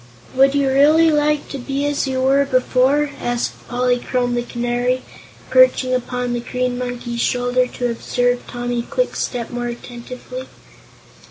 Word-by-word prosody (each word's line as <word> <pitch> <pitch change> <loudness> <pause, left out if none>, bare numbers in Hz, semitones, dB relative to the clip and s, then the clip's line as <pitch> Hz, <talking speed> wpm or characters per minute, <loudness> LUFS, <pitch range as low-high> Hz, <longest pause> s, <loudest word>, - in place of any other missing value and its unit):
"Would 270 +1 +4
you 280 -1 +2
really 305 +5 +5
like 300 0 +1
to 275 - -5
be 275 +3 -2
as 290 -1 0
you 260 -1 -1
were 275 +1 +4
before?" 270 +2 +2
asked 240 0 -3
Polychrome 245 0 0
the 240 - 0
Canary, 245 +1 -1 0.5
perching - - +4
upon 250 0 -2
the 240 - -1
Green 250 +1 -2
Monkey's 245 -1 -4
shoulder 250 0 +1
to 245 -1 -2
observe 245 +1 -1
Tommy 245 0 -3
Kwikstep 245 - -2
more 240 0 -3
attentively. 250 +2 -8
250 Hz, 140 wpm, -20 LUFS, 245-275 Hz, 0.5 s, really